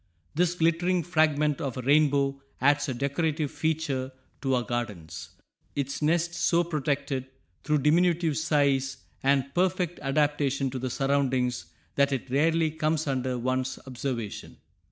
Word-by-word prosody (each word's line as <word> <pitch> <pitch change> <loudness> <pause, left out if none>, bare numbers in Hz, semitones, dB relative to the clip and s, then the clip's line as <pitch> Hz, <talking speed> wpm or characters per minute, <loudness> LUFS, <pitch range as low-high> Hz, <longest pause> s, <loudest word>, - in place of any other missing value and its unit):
This 175 +2 +1
"glittering 175 +1 +2
fragment 155 -2 +2
of 135 -5 -3
a 130 - -4
rainbow" 140 -1 +3 0.2
adds 145 +2 +3
a - - -1
decorative 145 +3 -1
feature 150 -5 -1 0.3
to 135 -2 +1
our 125 - 0
gardens, 105 -10 -5 0.5
its 140 0 -3
nest 170 +3 +1
so 175 0 +2
protected 140 -4 -2 0.4
through 150 -3 +1
diminutive 165 0 +3
size 140 -4 +1 0.2
and 140 0 +1
perfect 180 -1 0
adaptation 140 -1 +1
to 130 - -4
the 130 +1 -3
surroundings 130 -7 0 0.3
that 140 0 +4
it 135 -1 -3
rarely 160 +3 +2
comes 155 0 0
under 130 -2 -1
one's 130 +1 -1
observation. 125 -4 -5
140 Hz, 135 wpm, -27 LUFS, 130-160 Hz, 0.5 s, that